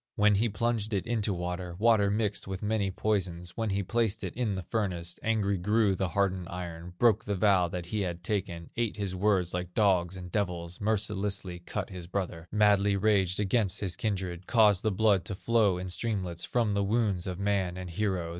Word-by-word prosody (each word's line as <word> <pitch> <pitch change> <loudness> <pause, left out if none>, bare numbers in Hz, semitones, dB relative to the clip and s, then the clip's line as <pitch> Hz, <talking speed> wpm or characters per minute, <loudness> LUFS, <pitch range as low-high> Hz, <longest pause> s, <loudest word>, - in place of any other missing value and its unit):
When 105 0 +4
he 110 +4 +2
plunged 110 0 -1
it 100 - 0
into 110 -3 0
water, 90 -1 -4
Water 110 -1 +4
mixed 105 -1 -1
with 95 0 -5
many 105 -2 0
poisons, 90 -4 -2
When 115 -2 -1
he 100 0 0
placed 110 +1 0
it - - -4
in 115 -5 -1
the 95 - -4
furnace, 90 -4 -3
Angry 100 -4 +1
grew 105 +2 +2
the 95 0 -1
hardened 95 -1 0
iron, 90 -1 -7
Broke 110 -1 +4
the 100 - -1
vow 95 -2 +3
that 85 0 -5
he 105 +4 -2
had 90 -2 -3
taken, 90 -5 -3
Ate 115 -3 -1
his 100 -3 -2
words 95 -2 +1
like 90 0 -4
dogs 95 -4 +2
and 90 -1 -8
devils, 90 -3 -3
Mercilessly 100 -3 -1
cut 95 +3 -5
his 90 -2 -7
brother, 90 -3 -4
Madly 105 -1 +4
raged 100 -2 +2
against 105 -1 +1
his 95 -4 -2
kindred, 95 -4 -3
Caused 105 -5 +5
the 110 - +1
blood 100 -2 +3
to 100 - -3
flow 105 -3 +2
in 90 +1 -5
streamlets 90 -3 -2
From 115 -4 +1
the 100 0 +1
wounds 100 -4 0
of 90 -1 -3
man 100 -2 0
and 90 0 -6
hero. 95 -2 -1
100 Hz, 195 wpm, -29 LUFS, 90-105 Hz, -, Caused